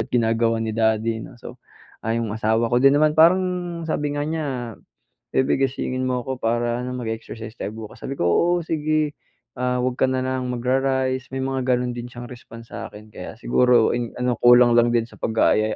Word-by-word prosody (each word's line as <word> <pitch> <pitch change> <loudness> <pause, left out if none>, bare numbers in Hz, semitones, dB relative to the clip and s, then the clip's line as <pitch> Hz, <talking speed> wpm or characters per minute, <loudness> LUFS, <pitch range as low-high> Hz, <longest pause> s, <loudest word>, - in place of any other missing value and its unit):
"Ba't 110 - -3
ginagawa 115 -1 +1
ni 110 - -2
daddy," 110 0 +1
'no. 120 - -10
So, 120 +1 -11 0.4
ah 115 +1 -1
'yong 115 -3 -2
asawa 110 +2 0
ko 120 - +4
din 135 +1 +6
naman 155 +1 +4
parang 175 +1 +2
sabi 150 -2 -1
nga 145 - -1
niya, 160 -1 -2 0.9
"Baby 130 +1 +2
gisingin 130 0 -3
mo 125 -1 -1
ko 130 +1 -5
para 120 +1 0
ano 125 0 -4
mag-exercise 115 -1 -6
tayo 105 - -4
bukas," 110 -1 -9
sabi 135 - -5
ko, - - -2
"Oo, 170 - +3
sige." 155 -1 0 0.5
"Ah, 125 0 0
huwag 125 0 -2
ka - - +4
na 130 0 -1
lang 130 -1 -2
magra-rice," 130 +1 0
may 130 - -2
mga 130 -1 -2
ganun 125 0 -2
din 120 0 -6
siyang 120 +1 -10
response 115 -1 -12
sa'kin, 105 +1 -9
kaya 90 -1 -8
siguro 120 0 +3
in 120 -1 -3
ano 125 -2 -1
kulang 120 0 +7
lang 120 0 +2
din 115 - +3
sa - - -17
pag-aaya. 110 -1 +2
125 Hz, 195 wpm, -22 LUFS, 115-130 Hz, 0.9 s, kulang